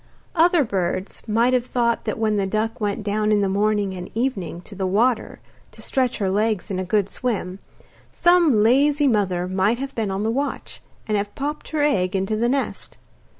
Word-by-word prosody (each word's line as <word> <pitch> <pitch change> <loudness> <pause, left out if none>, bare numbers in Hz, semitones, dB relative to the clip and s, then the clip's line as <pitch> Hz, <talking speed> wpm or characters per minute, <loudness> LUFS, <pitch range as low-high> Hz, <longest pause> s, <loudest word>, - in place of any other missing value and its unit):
Other 345 -1 +4
birds 190 -3 -3
might 230 +4 +2
have 250 -1 +1
thought 235 -2 0
that - - -2
when 215 -2 +1
the 195 -1 0
duck 220 +3 -2
went 205 +1 -1
down 210 +1 0
in 210 -1 +3
the 200 - +1
morning 205 0 +1
and 180 -1 -7
evening 215 -8 -2
to 205 - -11
the 190 -1 -2
water 230 +6 +1 0.3
to - - -13
stretch 255 -2 0
her 195 -3 0
legs 210 0 0
in 185 - -2
a - - -1
good 195 +1 +1
swim, 200 -5 -3 0.5
some 340 -11 +4
lazy 285 +5 +3
mother 190 -7 +1
might 190 +5 +1
have 275 +1 -5
been 220 -3 -2
on 195 +2 -2
the 220 - 0
watch, 280 +4 -3 0.3
and 215 -1 +1
have 205 0 -4
popped 295 +2 -4
her 305 -2 0
egg 190 -10 +1
into 195 +3 0
the 235 +2 +1
nest. 275 +1 -3
215 Hz, 195 wpm, -22 LUFS, 195-250 Hz, 0.5 s, Other